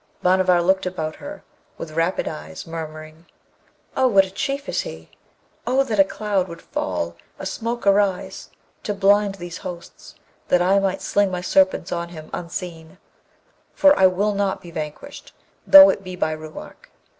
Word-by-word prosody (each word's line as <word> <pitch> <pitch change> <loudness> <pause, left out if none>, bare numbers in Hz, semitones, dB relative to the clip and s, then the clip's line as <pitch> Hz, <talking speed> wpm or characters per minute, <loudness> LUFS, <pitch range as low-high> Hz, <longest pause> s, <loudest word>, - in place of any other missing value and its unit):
Bhanavar 180 -1 +3
looked 190 +1 +2
about 155 -4 -4
her 295 +1 -9 0.3
with 160 - -7
rapid 165 +3 -1
eyes, 75 +1 -7
murmuring, 155 0 -8 0.7
'Oh, 260 - +3
what 195 -5 +5
a 190 - -11
Chief 280 +4 -3
is - - -1
he! 80 0 -10 0.6
Oh 260 +2 +3
that 225 -6 -3
a - - +9
cloud 195 -1 -2
would 170 -1 -9
fall, 85 -2 -3 0.2
a - - -7
smoke 230 +4 -4
arise, 200 -2 +1 0.3
to 205 - -3
blind 200 0 +3
these 175 -1 -8
hosts, 180 -2 -10 0.3
that 180 - +3
I 190 +3 +3
might 195 -1 -1
sling 205 -1 +2
my 180 -1 -4
serpents 190 0 +2
on 170 0 -3
him 155 -3 -11
unseen, 170 -1 -7 0.8
for 290 0 +6
I 190 - +6
will 200 +3 0
not 200 -1 -1
be 170 - -12
vanquished, 155 - -8 0.3
though 290 0 +10
it 195 - -6
be 185 -1 -7
by 160 -3 -1
Ruark!' 155 0 -10
185 Hz, 165 wpm, -22 LUFS, 165-200 Hz, 0.8 s, though